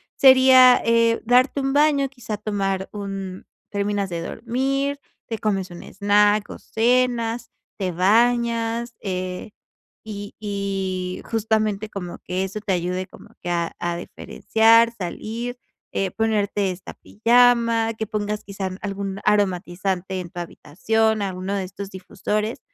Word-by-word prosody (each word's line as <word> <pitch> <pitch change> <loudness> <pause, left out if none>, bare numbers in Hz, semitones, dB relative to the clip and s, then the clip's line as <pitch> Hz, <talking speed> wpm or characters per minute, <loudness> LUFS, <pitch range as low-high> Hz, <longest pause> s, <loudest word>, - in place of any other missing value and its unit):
sería, 260 -1 +7
eh, 230 0 +3
darte 250 +4 +4
un 270 0 0
baño, 285 -2 +3
quizás 225 -5 -7
tomar 195 -2 -1
un 195 -2 -6 0.2
terminas 200 -1 -1
de 170 -1 -4
dormir, 275 +8 -2 0.3
te 225 - -2
comes 195 -3 -1
un 175 - -9
snack 205 +1 +2
o - - -7
cenas, 235 0 0 0.3
te 190 -3 -2
bañas, 230 +4 +2
eh, 185 +1 -4 0.5
y 205 -2 -7
y 195 -3 -3
justamente 215 -2 0
como 180 -4 -6
que 185 +2 -2
eso 195 +3 -5
te 205 -2 -2
ayude 180 +1 -2
como - - -16
que 175 - -5
a 170 -1 -1
a 175 0 -2
diferenciar, 225 +6 +3
salir, 230 +6 -5 0.3
eh, 195 -1 -1
ponerte 205 -2 0
esta 180 0 -10
pijama, 230 0 +3
que 220 0 -4
pongas 210 0 -3
quizás 195 -1 -4
algún 195 -1 -4
aromatizante 190 -2 0
en 175 -2 -8
tu 175 - -7
habitación, 220 +7 0
alguno 190 0 -3
de 195 -1 -1
estos 195 +1 -8
difusores, 210 +4 -3
210 Hz, 130 wpm, -23 LUFS, 190-230 Hz, 0.5 s, sería